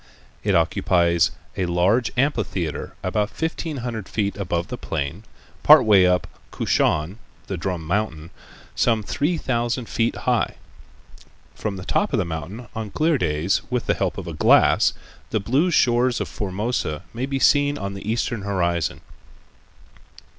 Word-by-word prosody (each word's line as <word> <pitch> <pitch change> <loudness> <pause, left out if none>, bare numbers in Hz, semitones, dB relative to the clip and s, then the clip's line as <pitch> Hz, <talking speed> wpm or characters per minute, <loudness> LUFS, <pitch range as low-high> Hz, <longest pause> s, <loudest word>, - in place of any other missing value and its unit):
It - - +2
occupies 85 -2 +3 0.3
a 90 - -1
large 90 +8 +2
amphitheater 110 - -1
about 105 +3 0
fifteen 160 -1 -3
hundred 110 -5 -5
feet 100 -2 -1
above 90 -2 -2
the 125 - -3
plain, 80 +4 -4 0.4
part - - +8
way 100 -4 +6
up 90 0 +2 0.2
Kushan, 85 +8 0 0.3
the 95 - -4
"Drum 90 -2 -3
Mountain," 85 -3 -2 0.4
some 115 -3 +1
three 155 - -1
thousand 120 -3 -1
feet 115 0 0
high. - - 0 1.0
From 105 -2 -4
the 95 -1 -8
top 205 - 0
of - - +3
the 100 - +1
mountain 85 +9 -6
on 110 -2 -5
clear 155 +4 +1
days 80 +1 0
with 125 -3 -1
the - - +2
help - - -2
of - - -5
a - - -6
glass - - +4 0.4
the 110 - 0
blue 130 - +1
shores 125 -5 +3
of 105 - -2
Formosa 95 -1 -3
may 125 +3 -3
be 135 0 -1
seen 145 +1 +3
on 100 -1 -4
the 100 +2 -4
eastern 115 -1 -1
horizon. 85 -5 -1
105 Hz, 150 wpm, -23 LUFS, 90-120 Hz, 1.0 s, part